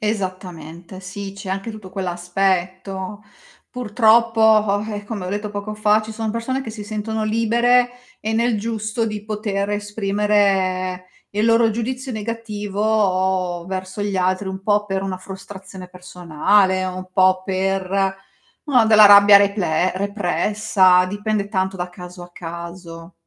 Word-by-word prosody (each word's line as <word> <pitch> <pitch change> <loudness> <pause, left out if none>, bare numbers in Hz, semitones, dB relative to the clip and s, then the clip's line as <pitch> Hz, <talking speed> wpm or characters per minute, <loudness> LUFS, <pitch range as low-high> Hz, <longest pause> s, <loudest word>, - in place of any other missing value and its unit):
Esattamente, 185 -4 -5
sì, 195 +1 -7
c'è 195 -1 -8
anche 195 +4 -3
tutto 215 -3 -11
quell'aspetto. 185 +2 -2 0.5
Purtroppo, 230 -1 +2 0.2
vabbè, 205 +1 -2
come 205 -4 -5
ho - - -4
detto 205 +2 -3
poco 205 +1 -5
fa 210 0 +2
ci 215 - -8
sono 220 0 -3
persone 230 +4 -2
che 265 - -7
si 215 -1 -7
sentono 215 +1 -3
libere 235 +3 +2 0.3
e 220 +1 -3
nel 230 0 +1
giusto 220 +1 -2
di 210 -1 -5
poter 210 -2 -3
esprimere 200 -3 0 0.2
il 210 +2 0
loro 230 0 +4
giudizio 255 +4 -4
negativo 205 -5 -1
verso 190 +1 -5
gli 205 -1 -2
altri, 185 +1 0
un 190 0 -5
po' 205 +1 +1
per 195 -1 -2
una 190 -1 -3
frustrazione 190 0 -10
personale, 180 +1 +1
un 185 0 -6
po' 185 -1 +3
per, 190 0 -1 0.8
mah, 255 -6 +4
della 215 -1 +7
rabbia 200 0 +9
reple 185 -4 +1
repressa, 195 -1 +2
dipende 205 +1 -2
tanto 190 -2 -1
da 180 0 -4
caso 180 0 -11
a 175 - -13
caso. 170 0 -9
200 Hz, 135 wpm, -20 LUFS, 185-215 Hz, 0.8 s, rabbia